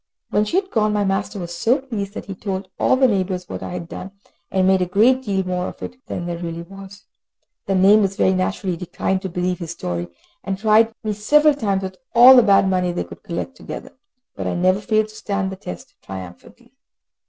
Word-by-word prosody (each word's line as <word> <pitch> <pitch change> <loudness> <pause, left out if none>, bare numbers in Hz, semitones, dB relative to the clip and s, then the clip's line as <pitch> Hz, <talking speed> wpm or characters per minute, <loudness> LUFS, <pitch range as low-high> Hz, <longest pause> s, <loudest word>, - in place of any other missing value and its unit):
When 210 +1 +2
she 210 - -3
had 385 -1 -9
gone, 215 -1 +2
my 205 -1 +1
master 195 +2 -1
was 175 -2 -5
so 230 +9 +2
pleased 220 -7 -5
that - - -6
he 195 - -6
told 190 0 -4
all - - +4
the 260 0 +4
neighbours 185 -4 -1
what - - -6
I - - -6
had 175 -2 -5
done, 185 - -7 0.4
and 190 -1 +1
made 190 0 +4
a 180 - +1
great 230 +8 +4
deal 195 -6 -1
more 180 0 -2
of - - -9
it 255 +2 -8
than 175 - -4
there 170 -1 -4
really 170 -1 -5
was. 195 +2 -12 0.6
The 195 - +1
neighbours, 195 +1 +5
very 190 - +3
naturally, 185 0 -1
declined 185 +2 -2
to 190 - -4
believe 180 0 -2
his 170 -3 -6
story, 90 - -4 0.4
and 195 -1 -3
tried 220 +2 +4
me 215 -1 -1
several 300 +9 +4
times 200 -8 -1
with 190 0 -6 0.2
all 250 +3 +10
the 250 - +8
bad 200 -3 +4
money 180 -1 +1
they 175 - -2
could - - -12
collect 200 +7 -5
together, - - -8 0.4
but - - -4
I - - -1
never 185 +3 +2
failed 215 0 +1
to 215 - -14
stand 200 -2 -2
the - - -5
test 90 - -9
triumphantly. 90 -2 -11
195 Hz, 220 wpm, -21 LUFS, 180-215 Hz, 0.6 s, all